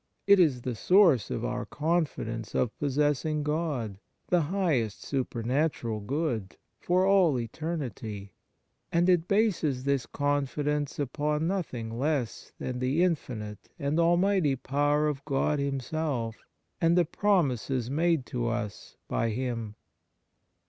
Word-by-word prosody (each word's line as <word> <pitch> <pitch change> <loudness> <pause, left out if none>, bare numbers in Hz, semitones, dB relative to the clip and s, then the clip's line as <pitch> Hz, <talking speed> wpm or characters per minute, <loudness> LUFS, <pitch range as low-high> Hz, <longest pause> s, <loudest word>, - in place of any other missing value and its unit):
It 200 -1 +6
is 140 -9 +3
the 125 - -2
source 175 - +4
of 115 - -2
our 125 0 -2
confidence 150 -8 -2
of 120 - 0
possessing 145 +1 +1
God, 145 - -2 0.3
the 175 -1 +4
highest 150 - 0
supernatural 125 -2 -1
good, 115 - -2 0.2
for 180 +1 +2
all 190 -8 +4
eternity, 115 - -5 0.6
and 170 +1 +3
it 175 -2 +3
bases 180 - +1
this 140 -3 0
confidence 145 0 -1
upon 150 +3 -1
nothing 125 -12 -3
less 140 -5 -1
than 125 -1 -4
the 135 +7 +2
infinite 115 - -3
and 145 +1 0
almighty 175 -3 +3
power 145 +3 +1
of 140 -2 -3
God 145 +1 0
Himself 135 -3 -2 0.5
and 165 +1 +4
the 175 - +5
promises 135 - +1
made 160 -2 +2
to 120 -1 -2
us 115 -3 -4
by 115 - 0
Him. 115 -2 -3
145 Hz, 120 wpm, -28 LUFS, 120-165 Hz, 0.6 s, It